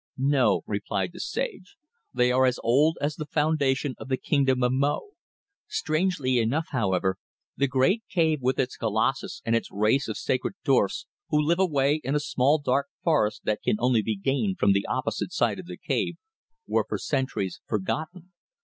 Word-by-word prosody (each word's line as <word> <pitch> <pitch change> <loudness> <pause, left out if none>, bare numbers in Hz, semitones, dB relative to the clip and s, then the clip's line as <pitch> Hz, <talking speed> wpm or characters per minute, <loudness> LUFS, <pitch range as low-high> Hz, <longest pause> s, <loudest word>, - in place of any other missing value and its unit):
"No," 130 -6 +2
replied 100 - -2
the 180 - -10
sage. 415 - -4 0.3
"They 125 0 +2
are 130 +1 +4
as 125 - 0
old 145 +8 +3
as 145 +2 -1
the 155 -3 -5
foundation 145 -3 +1
of - - -8
the 130 -1 0
Kingdom 130 -2 +1
of 125 - +3
Mo. 140 - 0 0.6
Strangely 155 -6 0
enough, 135 +9 0
however, 95 - 0 0.4
the 140 - +1
great 140 - +2
cave 160 -4 +2
with 130 +1 +1
its 130 - -1
colossus 115 +4 -1
and 115 0 +2
its 115 - -1
race 110 +7 +2
of 110 - -4
sacred 130 +8 -1
dwarfs 130 -9 +2 0.2
who 150 - +2
live 165 +4 +2
away 150 -4 +2
in 135 +3 -1
a - - +3
small 145 0 +2
dark 140 -1 0 0.2
forest 150 -11 +2
that 105 - -1
can - - +2
only 125 -1 +2
be 110 0 -2
gained 110 -3 0
from 100 - +3
the 100 0 0
opposite 130 - -2
side - - 0
of - - -9
the - - -7
cave, - - -1 0.5
were - - 0
for - - -1
centuries 100 -9 -2
forgotten. 160 - -3
135 Hz, 175 wpm, -26 LUFS, 115-150 Hz, 0.6 s, are